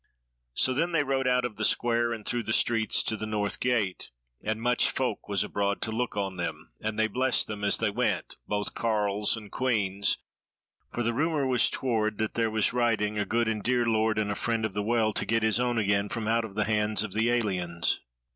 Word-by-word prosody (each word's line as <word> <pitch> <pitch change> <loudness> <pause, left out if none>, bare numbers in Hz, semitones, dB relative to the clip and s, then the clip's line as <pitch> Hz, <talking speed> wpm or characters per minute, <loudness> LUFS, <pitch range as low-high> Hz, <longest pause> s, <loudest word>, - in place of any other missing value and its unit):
So 130 - +2
then 170 +6 0
they 150 -3 +3
rode 135 -1 0
out 125 -1 +2
of 115 -3 -5
the 110 - -2
Square 120 +1 +2
and 110 -2 -7
through 120 - 0
the 110 - -1
streets 115 -2 +2
to 110 - 0
the 110 0 -5
North 105 -1 -1
Gate, 115 -7 0 0.3
and 110 +1 -1
much 120 +1 +3
folk 125 -6 -2
was 100 -2 +1
abroad 100 0 -1
to 110 - -1
look 115 -1 -2
on 95 -2 -2
them, 85 -7 -5
and 110 0 -3
they 110 - +3
blessed 125 +3 +1
them 105 -1 -6
as 100 - +3
they 115 -2 0
went, 125 +4 -1
both 105 0 -1
carles 105 -1 +1
and 105 -2 -10
queans; 100 -6 +1 0.7
for 120 - -2
the 120 +1 0
rumour 150 +2 +1
was 125 -2 +3
toward 110 -5 -1
that 110 -1 -2
there 115 -1 +1
was 110 +1 +1
riding 110 -4 +1
a 105 - 0
good 115 +2 0
and 110 -2 -1
dear 120 +2 +1
Lord 110 -1 +1
and 105 -1 0
a - - -2
Friend 115 0 -1
of 110 - -4
the 105 - 0
Well 110 0 +1
to - - +1
get 115 0 0
his 110 +2 +2
own 125 -1 0
again 100 -1 +1
from 110 0 -3
out 115 0 +2
of 100 -3 -10
the 105 - +1
hands 105 -1 +1
of 105 -3 -5
the 110 +2 +1
aliens. 90 -8 0
110 Hz, 225 wpm, -28 LUFS, 105-120 Hz, 0.7 s, they